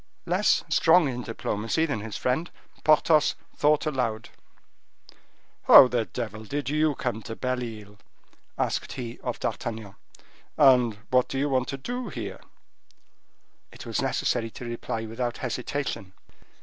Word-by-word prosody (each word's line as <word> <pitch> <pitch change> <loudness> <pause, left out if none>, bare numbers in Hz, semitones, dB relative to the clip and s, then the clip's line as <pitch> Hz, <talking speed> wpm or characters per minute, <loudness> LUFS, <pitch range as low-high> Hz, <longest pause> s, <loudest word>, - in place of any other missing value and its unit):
Less - - +2
strong 165 -1 +4
in 125 -2 -3
diplomacy 115 +5 -1
than 145 -8 -2
his 105 0 -6
friend, 135 +8 -1 0.3
Porthos 155 0 +4 0.2
thought 150 +1 +2
aloud. 120 -6 -2 1.4
"How - - +10
the 120 -2 0
devil 110 0 -6
did 140 +4 -3
you 155 -1 +2
come 120 -4 -3
to 115 +1 -7
Belle 130 0 -2
Isle?" 105 -3 -9 0.6
asked - - -2
he 120 -3 -6
of - - -4
D'Artagnan; 110 -3 -4 0.6
"and 125 -5 +5 0.2
what 125 -1 +3
do 135 - -3
you 145 +2 0
want 130 -1 +1
to 135 - -4
do 245 - -5
here?" - - -6 1.3
It - - -11
was - - -1
necessary 115 -2 0
to 120 - -9
reply 115 -1 -4
without 120 +2 -3
hesitation. 125 -5 -4
125 Hz, 135 wpm, -26 LUFS, 115-145 Hz, 1.4 s, How